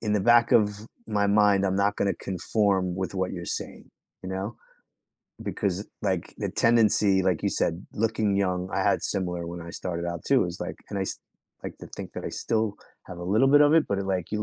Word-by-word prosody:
in 105 -2 0
the 105 - +2
back 120 +3 +5
of 105 -2 +5 0.4
my 105 -2 +1
mind, 100 -1 +4
I'm 95 0 0
not 100 +1 +1
gonna 100 -1 +1
conform 95 -1 0
with 95 +1 -3
what 95 -1 -1
you're 85 -2 -5
saying, - - -5 0.3
you 95 - -6
know. 95 +4 -4 0.9
Because 100 +1 -2 0.2
like 95 -4 -2
the - - -3
tendency, 105 -4 +3
like 90 -4 0
you - - +2
said, 85 +3 -1
looking 110 -2 +1
young, 90 -2 0
I 95 - 0
had 100 - +2
similar 90 -3 -2
when 85 0 -6
I 85 - -8
started 85 -1 -4
out 85 -2 -5
too - - +4
is - - -6
like, - - -4
and 100 - -3
I - - 0
s - - -4 0.4
like - - -7
to - - -9
think - - -8
that - - -6
I - - -2
still 110 -2 -1 0.3
have 90 - -8
a 85 - -6
little 110 +8 +3
bit 145 +1 +7
of 145 +1 +5
it, 160 - +4
but, 100 - 0
like, 95 -3 -2
you're 105 0 0
100 Hz, 220 wpm, -26 LUFS, 90-105 Hz, 0.9 s, bit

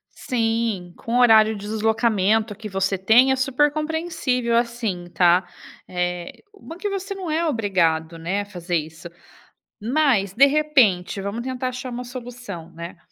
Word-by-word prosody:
Sim, 225 -7 -1
com 230 - -5
o 250 - +4
horário 220 -2 +6
de 205 0 -8
deslocamento 220 -1 +1
que 215 +1 -8
você 195 -1 -1
tem, 230 +7 +5
é 265 - +3
super 270 +3 +2
compreensível 305 -6 -1
assim, 235 -7 -2
tá? 180 0 +4 0.4
Eh, 180 -1 -4
uma 360 -5 -11
que 410 +3 -3
você 395 0 -4
não 375 -4 -5
é 330 +2 0
obrigado, 170 - 0
né, 175 +5 -2
a - - -3
fazer 180 -3 -4
isso. 160 +2 -5 0.7
Mas, 235 -6 +1
de 270 +7 +6
repente, 255 -11 +2
vamos 200 +4 -4
tentar 255 0 -3
achar 255 +1 -6
uma 245 +1 -5
solução, 245 -8 -8
né, 170 +1 -9
225 Hz, 155 wpm, -22 LUFS, 190-260 Hz, 0.7 s, horário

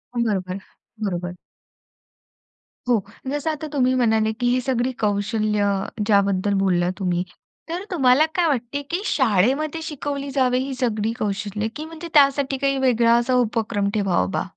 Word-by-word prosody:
बरोबर, 195 -6 -1 0.5
बरोबर. 180 -1 -3 1.5
हो. 235 -4 +3 0.3
जसं 290 +3 -1
आता 310 0 -5
तुम्ही 255 -2 +2
म्हणाले, 220 -3 +2
की 245 +2 -2
ही 250 - +2
सगळी 255 0 0
कौशल्य 210 0 +1 0.4
ज्याबद्दल 200 -1 +2
बोलला 180 -2 +2
तुम्ही. 180 -1 0 0.5
तर 350 +3 -3
तुम्हाला 270 -2 +4
काय 350 -2 +3
वाटतं, 270 0 -1
की 350 +3 -1
शाळेमध्ये 270 - +1
शिकवली 285 -2 -4
जावे 255 -2 +2
ही 265 +1 -3
सगळी 225 -3 -1
कौशल्य, 210 0 -2
की 310 - -5
म्हणजे 325 +1 -8
त्यासाठी 275 -2 +4
काही 275 0 0
वेगळा 235 -1 +4
असा 240 +2 +1
उपक्रम 215 -3 -1
ठेवा 195 - +1
बा? - - 0
240 Hz, 140 wpm, -22 LUFS, 205-275 Hz, 1.5 s, तुम्हाला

